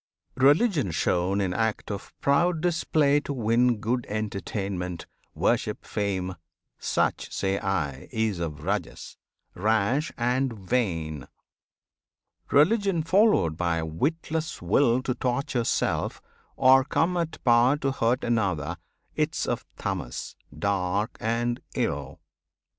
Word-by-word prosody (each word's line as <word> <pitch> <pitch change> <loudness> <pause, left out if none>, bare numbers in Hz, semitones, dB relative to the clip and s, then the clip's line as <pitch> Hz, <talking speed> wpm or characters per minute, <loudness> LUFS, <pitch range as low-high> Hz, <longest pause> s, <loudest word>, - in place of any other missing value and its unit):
Religion 145 - +4
shown 90 +4 +1
in 95 -2 0
act 110 0 -1
of 100 -1 -6
proud 165 +4 +3
display 155 -4 +2
To 145 - -5
win 120 0 +2
good 120 +4 -2
entertainment, 100 -4 -3 0.3
worship, - - 0
fame, 95 -3 -2 0.4
Such - - 0
say 95 0 -1
I 75 -9 -2
is 110 -5 0
of 75 -3 -4
Rajas, - - -3 0.4
rash 110 +8 +1
and 125 +2 +1
vain. 90 - -2 1.2
Religion 185 +3 +3
followed 185 - +3
by 85 -1 0
a 80 - -2
witless 155 - -2
will 120 +7 +2
To 125 - 0
torture 125 0 -1
self, - - 0 0.4
or 130 +1 +6
come 165 +5 +1
at 170 -2 -2
power 120 +3 +5
to 135 -2 -1
hurt 125 -1 0
Another, 90 -9 0 0.4
'tis - - 0
of - - -2
Tamas, - - -4 0.2
dark 100 +3 0
and 120 +2 -1
ill. - - -2
115 Hz, 115 wpm, -26 LUFS, 95-140 Hz, 1.2 s, or